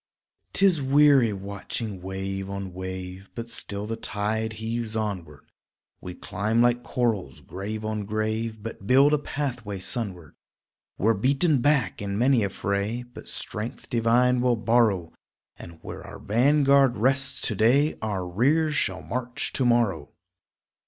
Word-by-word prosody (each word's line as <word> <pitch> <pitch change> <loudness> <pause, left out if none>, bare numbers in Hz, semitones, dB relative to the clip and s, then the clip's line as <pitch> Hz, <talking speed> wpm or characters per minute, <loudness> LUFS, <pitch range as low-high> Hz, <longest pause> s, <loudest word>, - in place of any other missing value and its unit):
'Tis 190 -6 +4
weary 135 -3 +5
watching 100 +1 -5
wave 95 +1 -4
on 100 -2 -5
wave, 95 +1 -6
But 115 0 -6
still 105 -3 -4
the 115 +1 -3
tide 110 +1 -2
heaves 110 +1 -3
onward; 95 -10 -4 0.6
We 90 -1 -7
climb 105 +5 -1
like 120 0 +3
corals, 115 - -1
grave 105 +3 -6
on 110 -1 -3
grave, 110 +1 -2
But 105 -3 -7
build 135 +4 +5
a 150 - +3
pathway 125 -9 -4
sunward; 95 - -3 0.6
We're 110 +4 +3
beaten 135 - +2
back 140 -5 +2
in 100 -1 -3
many 125 +1 +3
a 100 - 0
fray, 100 +5 -2
But 120 0 -13
strength 105 +3 -6
divine 120 +2 +3
will 125 -1 +3
borrow 110 -7 +2 0.4
And 85 -1 -11
where - - -7
our - - -10
vanguard 135 +2 +3
rests 135 +5 +1
to - - -1
day 125 +9 +3
Our 100 -4 -2
rear 145 - +2
shall 95 -10 0
march 125 0 -3
to 130 - +1
morrow. 110 -12 +2
110 Hz, 140 wpm, -25 LUFS, 100-125 Hz, 0.6 s, weary